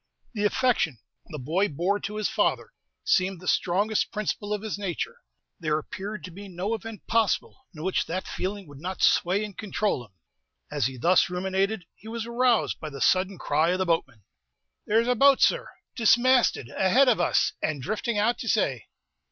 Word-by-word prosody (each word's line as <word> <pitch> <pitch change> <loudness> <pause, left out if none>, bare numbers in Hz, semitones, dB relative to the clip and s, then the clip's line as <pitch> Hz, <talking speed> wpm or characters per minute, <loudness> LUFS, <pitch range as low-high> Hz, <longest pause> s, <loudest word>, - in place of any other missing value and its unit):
The 210 -2 -1
affection 220 - +1 0.3
the 155 - -7
boy 165 +10 0
bore 180 +7 0
to 210 +1 -5
his 215 -1 0
father - - 0 0.3
seemed 190 - +1
the 180 - -11
strongest 205 +5 +1
principle 210 0 -3
of 210 0 -2
his 215 -2 -4
nature. 325 - -4 0.4
There 155 -3 0
appeared 200 +7 -6
to 180 - -8
be 200 +4 -10
no 190 +4 -3
event 225 -2 -7
possible 230 +4 0
in 155 - -7
which 190 +1 0
that 185 +3 -3
feeling 195 +1 -4
would 145 -2 -12
not 185 +4 -4
sway 190 +4 +3
and 205 -3 -10
control 210 - -1
him. 105 -5 -19 0.6
As 140 -5 +1
he 130 -1 -7
thus 175 +9 +3
ruminated, 190 +2 -1
he 220 - -16
was 225 0 -4
aroused 235 0 +1
by 155 - -6
the 140 -2 -9
sudden 185 +5 +2
cry 155 +2 +1
of 180 - +1
the 185 - 0
boatman. 135 - -1 0.6
"There's 225 +3 +3
a 250 - +4
boat, 275 +3 +5
sir, - - +2 0.3
dismasted, 240 - +3
ahead 245 +9 +4
of 235 -7 +4
us, 175 - +2
and 155 -2 -1
drifting 215 - -2
out 225 +4 +1
to 230 - -4
say." 135 - 0
195 Hz, 185 wpm, -26 LUFS, 175-220 Hz, 0.6 s, boat